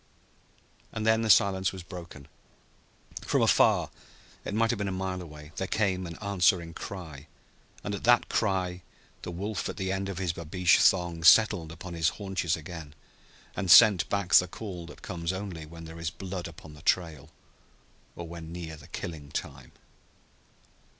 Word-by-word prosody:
And 110 - -4
then 110 0 +4
the 110 - -1
silence 95 -2 +4
was 95 -2 -8
broken. 85 -6 -10 0.9
From - - +1
afar - - +4 0.5
it 105 - -4
might 115 0 +2
have 120 - -3
been 100 - -1
a - - -2
mile 95 0 -3
away 75 -2 -11
there 95 - -2
came 95 -4 0
an 85 - -8
answering 90 -4 +1
cry; 80 -7 -8 0.6
and 100 - -3
at 100 - -5
that 120 0 +5
cry 95 -4 -1 0.4
the - - -6
wolf 95 0 -4
at - - -6
the 95 -2 -2
end 95 0 -2
of 95 - -5
his 90 -3 -1
babeesh 85 +2 +2
thong 85 -3 +2
settled 85 -3 +5
upon 85 +2 -9
his 85 0 +2
haunches 95 -5 -1
again 80 -2 -9 0.6
and 95 -3 -3
sent 100 -2 +8
back 100 -5 -1
the 90 - +7
call 90 -3 -7
that 75 - -13
comes 85 -1 -3
only 95 -5 -6
when 85 +1 -11
there 80 +1 -10
is 85 -1 -2
blood 90 +1 -6
upon 80 -2 -12
the 75 - -14
trail 80 -5 0 0.9
or 85 - -7
when 85 -1 -9
near 85 -2 -7
the 70 - -14
killing 75 -4 -7
time. - - -6
90 Hz, 170 wpm, -28 LUFS, 80-95 Hz, 0.9 s, sent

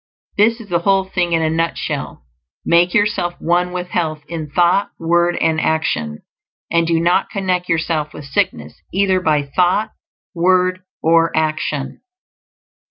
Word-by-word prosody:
This 225 +3 +3
is 225 - -11
the 170 -1 +1
whole 195 +2 +2
thing 180 -2 -1
in 165 -1 +2
a 160 - +1
nutshell: 165 +1 -3 0.4
_make 170 +1 +4
yourself 205 -5 +1
one 180 +1 +1
with 180 0 -5
Health 155 -4 -2
in 160 -3 -5
thought, 175 +5 +2
word, 175 +1 +1
and 160 -1 +1
action; 80 - -1 0.5
and 170 0 +2
do 165 -1 +2
not 175 +3 +2
connect 185 -2 -2
yourself 160 -2 0
with 150 - -10
sickness 75 - -2
either 190 0 +2
by 155 -5 +1
thought, 180 +9 +1 0.4
word, 185 +1 +2 0.2
or 165 +1 +4
action_. 155 -3 -2
170 Hz, 145 wpm, -18 LUFS, 160-185 Hz, 0.5 s, make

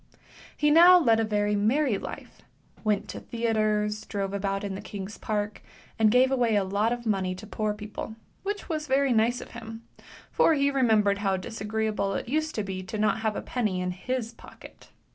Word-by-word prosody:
He 295 0 +3
now 350 +3 +9
led 230 -10 +4
a - - +2
very 210 -1 0
merry 225 +2 +2
life; - - -9 0.4
went 210 -2 0
to - - -6
theatres, 215 -2 0
drove 195 -1 -3
about 195 0 -2
in 200 -1 -3
the 190 - -6
King's 200 0 -7
Park, 210 -1 -3 0.4
and 220 -1 +5
gave 255 +3 +4
away 240 -4 +2
a 200 - +3
lot 205 +4 0
of 240 0 -3
money 190 -4 0
to 190 +4 -10
poor 215 0 -2
people, 210 +1 -7 0.3
which 410 +1 -4
was 310 -3 -3
very 270 -1 +2
nice 230 +2 +2
of - - -11
him; 225 -1 -9 0.5
for 325 - +4
he 280 0 +2
remembered 215 -7 +3
how 195 -2 +1
disagree 220 +3 -3
able 200 -2 -1
it - - -4
used 310 +4 -1
to 215 - -1
be 190 -1 -4 0.2
not 215 0 +3
to - - -6
have 220 -1 -1
a - - -4
penny 215 -7 -1
in 180 0 -1
his 230 +5 -4
pocket. - - -15
215 Hz, 200 wpm, -27 LUFS, 205-245 Hz, 0.5 s, now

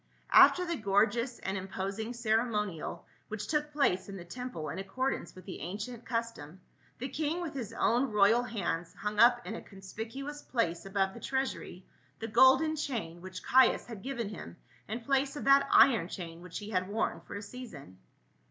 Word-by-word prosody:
After 360 - +8
the 340 -2 -2
gorgeous 230 +4 +1
and 190 - -4
imposing 195 +4 -4
ceremonial 215 -7 -1 0.2
which 215 -1 -5
took 300 -1 -1
place 205 -11 +1
in 195 - -6
the 175 - -9
temple 245 -5 -6
in 175 - -5
accordance 255 +8 -3
with 185 - -12
the 190 - -7
ancient 210 +8 -6
custom 230 - -4 0.4
the 255 - -4
king 310 +4 -2
with 340 -4 -4
his 240 -6 -5
own 240 +2 +2
royal 210 +3 +5
hands 185 -8 -3
hung 210 0 -3
up 240 +1 +6
in 195 - -4
a - - -6
conspicuous 225 +9 -7
place 175 -7 -1
above 195 -1 0
the - - -9
treasuiy 265 -8 -3 0.3
the 225 - -5
golden 260 +7 +5
chain, 230 - -4
which 185 0 -8
Caius 260 0 +5
had 225 -5 -8
given 240 -4 -3
him 85 - -9 0.3
in 225 +3 -4
place 275 +3 +1
of 290 - -5
that 275 0 +5
iron 230 -11 +6
chain 170 -3 -7
which 180 -1 -7
he 210 +1 -7
had 185 -2 0
worn 220 +2 -1
for - - -9
a 200 - -5
season. 200 - -10
220 Hz, 180 wpm, -31 LUFS, 190-255 Hz, 0.4 s, After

